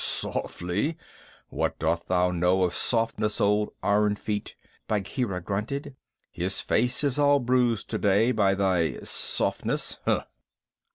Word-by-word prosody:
"Softly! 100 - -1 0.5
What - - -2
dost 85 +1 -1
thou 90 0 +2
know 90 +2 +2
of 90 - 0
softness, 115 -2 +1
old 105 +1 +2
Iron 105 0 +2
feet?" 105 0 -4 0.3
Bagheera 100 -1 -2
grunted. 125 +10 -4 0.4
"His 90 +2 -1
face 125 +5 +1
is 140 -1 0
all 145 0 +5
bruised 125 -3 +1
today 105 +5 +2
by 100 -5 +2
thy 95 -4 +1
softness. - - -1
105 Hz, 115 wpm, -26 LUFS, 95-120 Hz, 0.5 s, all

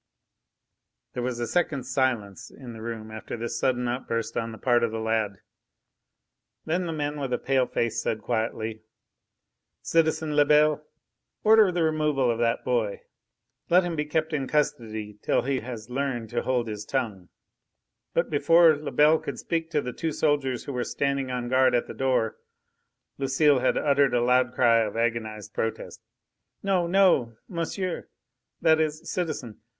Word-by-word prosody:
There 125 - -3
was 120 -1 -3
a 120 - -1
second's 140 -2 -1
silence 120 -7 -1
in 125 -3 -11
the 110 - -10
room 110 -1 -6
after 110 +2 -6
this 115 0 -4
sudden 125 0 +1
outburst 115 -2 -3
on 115 -1 -2
the 110 - -9
part 120 -1 +2
of 115 - +2
the 110 - -4
lad. 110 -2 0 1.3
Then 175 +3 -1
the - - -2
man 150 -1 -3
with 135 -2 -3
the 125 - 0
pale 130 -2 +1
face 115 0 -1
said 110 - -2
quietly: 110 -1 -2 1.0
"Citizen 160 -2 +1
Lebel, 150 +1 +4 0.6
order 220 -3 +6
the 175 -1 0
removal 150 -5 +1
of 115 - -3
that 115 -1 0
boy. 115 -5 -1 0.7
Let 180 +2 +5
him 175 -1 -3
be 150 -1 -1
kept 155 +1 -1
in 135 -3 -1
custody 110 -8 -2
till - - +1
he 135 0 0
has 115 -1 -8
learned 125 -4 -2
to - - 0
hold 125 -2 0
his 105 -1 -5
tongue." 110 -8 -3 0.9
But 170 0 +1
before 165 +2 +5
Lebel 150 +1 +3
could - - -6
speak 165 -1 -2
to 150 -3 0
the 125 -2 -5
two 160 +3 -3
soldiers 145 -5 0
who 140 - -6
were 125 -1 -1
standing 140 0 -1
on 125 -1 -3
guard 130 0 +3
at 120 - +1
the - - -8
door, 130 -4 0 0.8
Lucile 135 +1 +3
had 130 - +1
uttered 140 -3 +3
a 120 - +2
loud 125 0 +3
cry 115 -2 +4
of 110 -1 -1
agonised 110 -3 -2
protest. 110 0 -4 0.6
"No! 190 -3 +1
no! 175 - +3
monsieur! 180 +1 -4 0.5
that 160 0 +5
is 155 +1 -2
citizen!" 155 - -4
130 Hz, 165 wpm, -26 LUFS, 115-150 Hz, 1.3 s, order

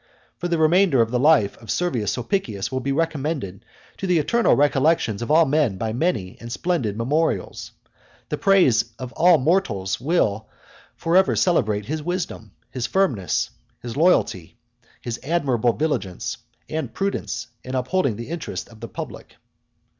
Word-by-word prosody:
For 175 - -2
the 170 -1 0
remainder 160 -2 +4
of 115 - -5
the 125 - +1
life 140 -7 +4
of 115 - -14
Servius 125 - 0
Sulpicius 120 - -2
will 130 - -1
be 135 +2 -2
recommended 145 - -2 0.3
to 195 - -4
the 180 -2 +3
eternal 230 +10 +3
recollection 145 -6 +2
of 120 - -4
all 160 +2 +6
men 140 -8 +1
by 110 +2 -2
many 120 - -1
and 120 0 -8
splendid 125 - -1
memorials. 150 +8 -1 0.6
The - - -3
praise 175 - +3
of 130 0 -7
all 175 0 +5
mortals 130 - 0
will 110 - 0 0.5
for 165 +1 -1
ever 190 0 +4
celebrate 110 - +1
his 155 +5 -3
wisdom, 170 - -4 0.2
his 125 -2 -3
firmness, 125 - 0 0.3
his 120 -1 -6
loyalty, 140 - +1 0.4
his 120 -1 -5
admirable 135 -7 +1
vigilance 120 - -2 0.3
and 160 0 -3
prudence 160 - -3
in 130 +1 -5
upholding 130 - 0
the 115 +5 -7
interests 155 - -5
of 110 - -15
the 115 - -7
public. - - -8
135 Hz, 155 wpm, -23 LUFS, 115-165 Hz, 0.6 s, all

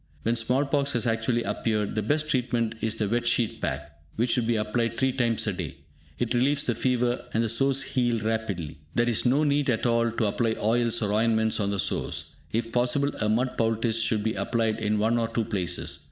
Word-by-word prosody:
When 115 +1 +1
small 125 +4 +1
pox 140 0 0
has 120 0 0
actually 115 +1 0
appeared, 105 -3 -1
the 110 - 0
best 150 +8 0
treatment 120 -5 0
is 110 0 0
the 110 -2 -1
"Wet 120 +3 0
Sheet 120 -2 +1
Pack", 75 0 -4
which 120 +2 +1
should 120 -3 +2
be 120 - +2
applied 115 +2 -1
three 130 0 +2
times 120 -3 0
a 105 - -1
day. 90 -5 -6 0.4
It 120 0 -1
relieves 140 +4 +2
the 120 - 0
fever, 125 +1 0
and 115 - +3
the 115 - 0
sores 135 +4 +3
heal 120 -2 0
rapidly. 105 -8 -3 0.2
There 120 0 +2
is 120 +1 +1
no 140 +5 +3
need 145 -1 +1
at 115 -1 0
all 115 -1 +2
to 115 0 -1
apply 110 +2 0
oils 115 +1 +1
or 105 -1 0
ointments 110 0 +2
on 100 -1 0
the 100 -1 -2
sores. - - -2 0.2
If 115 +1 -1
possible, 125 +4 +1
a 105 - +1
mud 125 +4 0
poultice 115 0 +1
should 110 -2 +1
be 110 0 0
applied 115 -2 -1
in 105 0 +1
one 115 +3 +2
or 115 - 0
two 115 0 -2
places. 90 -4 -3
115 Hz, 215 wpm, -26 LUFS, 110-125 Hz, 0.4 s, and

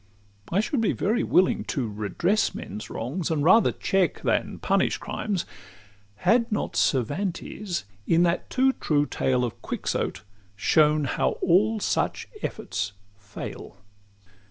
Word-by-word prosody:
I 190 +4 +3
should 235 +3 -1
be 220 - +2
very 225 +5 0
willing 185 - +3
to 130 -6 -2
redress 110 - 0
Men's 105 +3 -7
wrongs, 145 +9 -3
and 155 -3 0
rather 195 +7 +6
check 190 -2 0
than - - 0
punish - - +1
crimes, 200 -5 -3 0.7
Had 230 - +2
not 210 - -2
Cervantes, 175 - -1 0.2
in 170 +1 +4
that 170 0 0
too 265 +1 +3
true 145 - +1
tale 125 -3 0
Of 120 - -7
Quixote, - - -2 0.3
shown 150 +7 +3
how 135 - 0
all 210 +5 +3
such - - -1
efforts 100 - -3 0.2
fail. 105 -1 -9
170 Hz, 130 wpm, -26 LUFS, 125-205 Hz, 0.7 s, rather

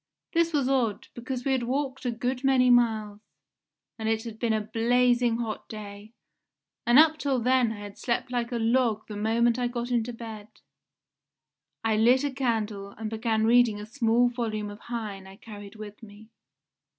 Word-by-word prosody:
This 335 0 +2
was 285 -5 +1
odd, 250 -6 0
because 245 +1 -5
we 270 - +1
had 260 -2 +1
walked 265 +2 -3
a 245 - +1
good 250 +3 -3
many 260 -2 +4
miles, 220 -4 +2 0.8
and 220 0 -1
it 225 0 0
had 225 -2 -8
been 235 -2 0
a 220 - +2
blazing 240 +2 +2
hot 225 -3 -5
day, 210 0 -9 0.8
and 240 +2 +6
up 315 0 +6
till 275 -3 0
then 250 -1 +2
I 210 -2 -7
had 205 -1 -10
slept 250 +1 -2
like 240 -1 -2
a - - -2
log 230 -1 +1
the 210 - -7
moment 230 +3 +1
I 245 - +1
got 240 0 -4
into 240 0 0
bed. 225 -3 -9 1.4
I 220 -1 +1
lit 245 +5 +4
a 285 - -1
candle 220 -6 -2
and 220 0 -5
began 220 -1 0
reading 230 -2 +4
a 210 - -7
small 235 0 +2
volume 220 -4 -3
of 205 - -11
Heine 215 -6 -6
I 190 - -12
carried 205 -1 -11
with 210 0 -10
me. 215 0 -14
230 Hz, 180 wpm, -27 LUFS, 215-250 Hz, 1.4 s, and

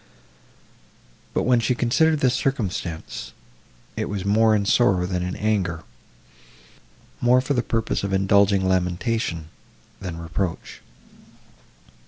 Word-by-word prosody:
But, - - +1
when 125 -1 +3
she 125 +2 0
considered 150 +6 +2
this 125 -2 +3
circumstance, 95 -12 -3 0.6
it - - -3
was 100 -2 -4
"more 110 +2 +4
in 100 -1 0
sorrow 95 -5 +3
than 90 -1 -2
in 90 +1 -3
anger,"—more 95 -6 -1 1.6
for 130 +3 -1
the 120 - +1
purpose 115 -3 -2
of 100 - -2
indulging 95 0 +3
lamentation, 90 -2 -1 0.5
than 90 -4 -6
reproach. 85 +1 -4
100 Hz, 110 wpm, -23 LUFS, 90-115 Hz, 1.6 s, more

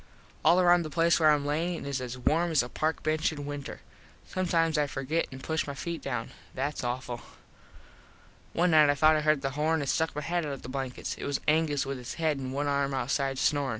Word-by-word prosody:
All 165 +4 +5
around 175 -1 +5
the 155 - -5
place 170 +3 +3
where 155 -1 +5
Im 145 -1 +1
lyin 160 +2 -1
is 140 -2 -2
as 125 0 -5
warm 165 +7 +1
as 155 -6 +3
a 120 - -7
park 155 +4 -1
bench 155 +1 +1
in 145 -2 -6
winter. 145 -1 -6 0.4
Sometimes 165 -3 0
I 150 -1 +2
forget 140 +5 -1
and 130 0 -9
push 160 -1 -1
my 140 - -5
feet 170 +4 -4
down. 120 -4 -4 0.2
That's 140 +2 -2
awful. 120 -1 -3 1.3
One 175 +1 +2
night 155 -2 +6
I 145 - +3
thought 155 +2 +5
I 155 - +1
heard 155 -2 +2
the 135 - -1
horn 155 +3 +1
and 140 - -3
stuck 160 +3 0
my 150 - -2
head 175 +2 -1
out 145 -2 -3
of 135 - -8
the - - -7
blankets. 130 -1 -4
It - - -5
was 140 -1 -1
Angus 155 -2 +2
with 135 -1 -4
his 120 -1 -7
head 155 -3 0
and 130 -1 -4
one 140 +2 -1
arm 140 -1 0
outside 135 0 -1
snorin. 145 0 +1
145 Hz, 230 wpm, -29 LUFS, 135-160 Hz, 1.3 s, night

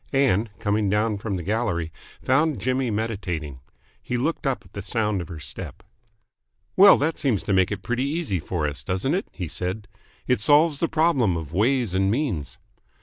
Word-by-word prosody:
Ann, 120 -6 +2
coming 105 -1 0
down 105 +1 +1
from 100 -1 -3
the 90 - -4
gallery, 95 -5 -1 0.3
found 145 0 +2
Jimmy 130 +3 0
meditating. 95 - -3 0.4
He 125 - -3
looked 145 +3 -1
up 130 -7 -1
at 90 - -20
the 100 - -5
sound 105 -1 -1
of 85 - -7
her 85 -4 -8
step. 75 - -8 0.9
"Well, 195 +1 +8
that 155 +3 -1
seems 125 -8 +1
to 100 - -1
make 95 -1 +3
it - - -4
pretty 125 +6 -1
easy 145 - -1
for 80 -1 -2
us, 75 0 -5
doesn't 95 - -1
it?" 190 +3 -1
he 90 - -5
said. 90 +7 -4 0.4
"It 125 -5 +1
solves 150 +4 +4
the 165 - +1
problem 155 - +2
of 80 -2 -7
ways 115 +1 +1
and 95 +1 +2
means." 110 - -2
105 Hz, 185 wpm, -24 LUFS, 95-135 Hz, 0.9 s, Well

